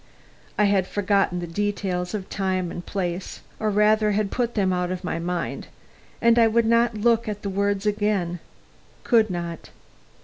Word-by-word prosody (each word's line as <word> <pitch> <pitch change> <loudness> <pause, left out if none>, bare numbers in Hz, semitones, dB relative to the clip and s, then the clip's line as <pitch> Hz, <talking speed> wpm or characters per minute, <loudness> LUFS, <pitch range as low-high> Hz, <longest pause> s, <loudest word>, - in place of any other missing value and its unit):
I 210 - +4
had 200 -2 +2
forgotten 195 -3 +1
the - - -3
details 185 0 -2
of 195 -3 -5
time 185 -2 -1
and 175 - -6
place, 180 -1 -4 0.2
or 215 - 0
rather 210 +1 +3
had 205 -1 0
put 240 -1 -1
them 190 -3 +2
out 180 0 -1
of 185 0 -4
my 180 - -2
mind, 175 0 -3 0.5
and 235 0 +4
I 230 - +6
would 230 +1 +2
not 230 0 +3
look 230 +1 +2
at 205 -1 -5
the 200 - -2
words 200 +1 0
again 205 -4 0 0.6
could 225 -2 +3
not. 170 -2 -5
200 Hz, 170 wpm, -24 LUFS, 180-215 Hz, 0.6 s, I